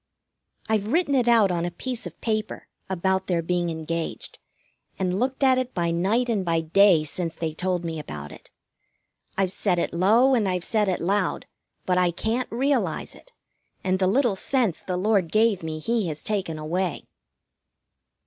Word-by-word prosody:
I've 215 -2 0
written 300 +3 +1
it 250 -3 +2
out 225 -5 +5
on 170 -1 -1
a 175 - -1
piece 245 +7 -4
of - - -13
paper, 215 -2 -2 0.2
about 190 +1 0
their 170 -2 0
being 175 0 0
engaged, 165 0 -4 0.6
and 185 0 -1
looked 260 +3 -1
at 260 -1 +5
it 255 0 -4
by 170 -1 0
night 200 +9 +1
and 215 -5 0
by 165 -2 +1
day 170 0 +5
since 165 +2 -4
they 160 -1 -3
told 180 +1 -2
me 165 -1 -3
about 75 - -7
it. - - -14 0.9
I've 190 -2 +1
said 190 -2 0
it 170 - -1
low, 220 +10 +4
and 220 -6 +2
I've 180 -1 -1
said 215 -4 +1
it 185 - -1
loud, 190 +1 0 0.4
but 180 -1 +2
I 180 -1 +3
can't 225 +8 -2
realize 270 +5 0
it, - - -17 0.5
and 185 0 +1
the 185 - +2
little 240 +1 +2
sense 230 - 0
the 180 -1 -3
Lord 190 -3 +1
gave 215 -2 +3
me 160 -1 -4
He 220 +4 -1
has 155 -2 -5
taken 190 -7 -2
away. 170 +4 -2
190 Hz, 175 wpm, -25 LUFS, 170-225 Hz, 0.9 s, out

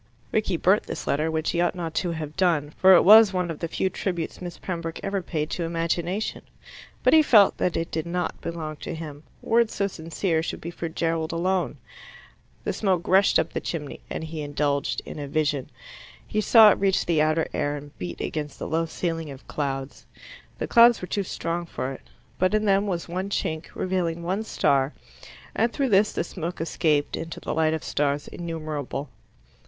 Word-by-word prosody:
Rickie - - 0
burnt - - +4
this - - -5
letter, 155 +3 +1
which 160 0 -1
he 170 - 0
ought 175 - +1
not 165 -3 -4
to 180 - 0
have 155 -2 -6
done, 165 -6 +1
for 190 0 +8
it - - +6
was 215 0 +8
one 180 -2 -1
of 155 - -7
the 165 - -2
few 180 - -1
tributes 180 -3 -3
Miss 175 -2 -6
Pembroke 170 -3 -5
ever 195 -1 -1
paid 155 -3 -3
to 175 - -2
imagination. 170 +4 -2 0.6
But - - +5
he 315 - +8
felt 215 -9 +5
that 180 - 0
it 165 +1 -3
did 160 0 -3
not 180 +1 -3
belong 160 -2 -5
to 170 - -6
him: 150 -3 -8 0.2
words 230 0 +2
so 200 - +1
sincere 165 -1 -1
should - - -4
be 170 - -6
for 165 -1 -5
Gerald 165 0 -1
alone. 180 +2 0 0.9
The - - -1
smoke 185 -5 0
rushed 195 +1 +5
up - - 0
the - - -2
chimney, 150 -4 -5
and - - -4
he 160 -1 -5
indulged 145 -1 -1
in - - -7
a 145 - -4
vision. 145 -2 -1 0.6
He 215 - -1
saw 220 -1 +8
it - - 0
reach 195 -1 +2
the 165 -3 +2
outer 155 +1 +2
air 145 0 -1
and 145 0 -10
beat 90 -1 -5
against 150 -2 -4
the - - -5
low 165 +1 0
ceiling 165 -2 -3
of 135 -1 -11
clouds. 135 -2 -4 0.5
The - - -2
clouds 235 0 +7
were 180 - -6
too 200 - -1
strong 170 -2 -3
for 130 -4 -4
it; 135 - -9 0.4
but 185 +3 +3
in 215 0 +1
them 200 0 +3
was 175 -3 -2
one 185 +3 -3
chink, 160 -4 -2
revealing 175 -3 -1
one 190 +5 -1
star, 140 -8 +1 0.6
and 230 +1 +2
through 275 0 0
this 205 0 +4
the - - -1
smoke 175 -1 -5
escaped 155 -2 0
into 165 0 -6
the - - -4
light 160 0 +2
of 160 - -6
stars 145 0 -1
innumerable. 155 -4 -5
165 Hz, 200 wpm, -25 LUFS, 155-185 Hz, 0.9 s, for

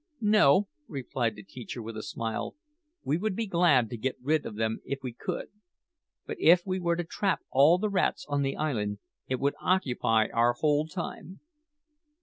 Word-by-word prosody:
"No," 205 -4 +4 0.2
replied 125 -4 -2
the 105 - -11
teacher 120 +4 -8
with 115 0 -7
a 110 - -4
smile. 115 +1 -4 0.5
"We 150 - +1
would 205 +1 -2
be 230 - -1
glad 170 - +3
to 120 - -4
get 130 +4 -2
rid 150 +4 0
of 105 - -7
them 110 +1 -1
if 135 0 -5
we 125 -2 -4
could; 115 - -5 0.8
but - - -5
if 175 +2 +5
we 185 -1 -1
were 170 -1 +1
to 175 - -2
trap 190 +3 -1
all 145 +6 +6
the 215 +3 -1
rats 200 -2 0
on 145 -1 0
the 135 -1 -1
island, 105 -9 -1 0.3
it 130 -1 -1
would 140 +1 +1
occupy 125 -11 +2
our 120 +1 +3
whole 150 +3 +1
time." 175 +1 -7
140 Hz, 180 wpm, -28 LUFS, 120-175 Hz, 0.8 s, all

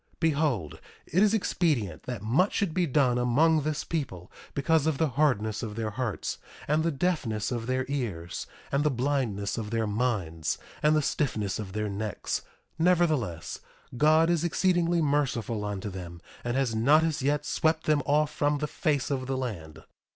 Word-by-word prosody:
1:3 - - -46
Behold, 145 - 0 0.3
it 185 - +1
is 210 -1 +5
expedient 145 - 0
that 120 -5 -4
much 140 - +2
should 195 -6 0
be 180 -1 +1
done 130 -3 +3
among 150 +6 +3
this 150 +1 -2
people, 120 - -4 0.2
because 155 +2 +2
of 155 -3 +1
the 160 0 +2
hardness 115 -6 +1
of 110 -3 -5
their 110 -1 -2
hearts, 115 -1 -3 0.3
and 150 +2 +2
the 165 - +1
deafness 135 - -1
of 120 -2 -3
their 130 0 0
ears, 110 -12 -3 0.2
and 140 +1 +2
the 150 - +3
blindness 125 -7 -1
of 105 -2 -4
their 115 0 0
minds, 105 -8 -1 0.2
and 150 +1 +4
the 155 - +2
stiffness 110 -10 -1
of 95 -3 -6
their 105 0 -1
necks; 105 0 -3 0.4
nevertheless, 160 - +1 0.4
God 155 +5 +4
is 170 -2 +1
exceedingly 175 -1 +2
merciful 125 -7 0
unto 105 0 -4
them, 85 -2 -8 0.2
and 120 +1 -1
has 135 -4 +1
not 140 +8 +4
as 160 -4 0
yet 145 +2 +1
swept 160 0 +1
them 150 -1 +2
off 150 +1 +2
from 145 0 +1
the 150 - -2
face 145 -2 -1
of 130 -2 -2
the 135 -1 -1
land. 80 -11 -5
135 Hz, 175 wpm, -28 LUFS, 110-155 Hz, 0.4 s, is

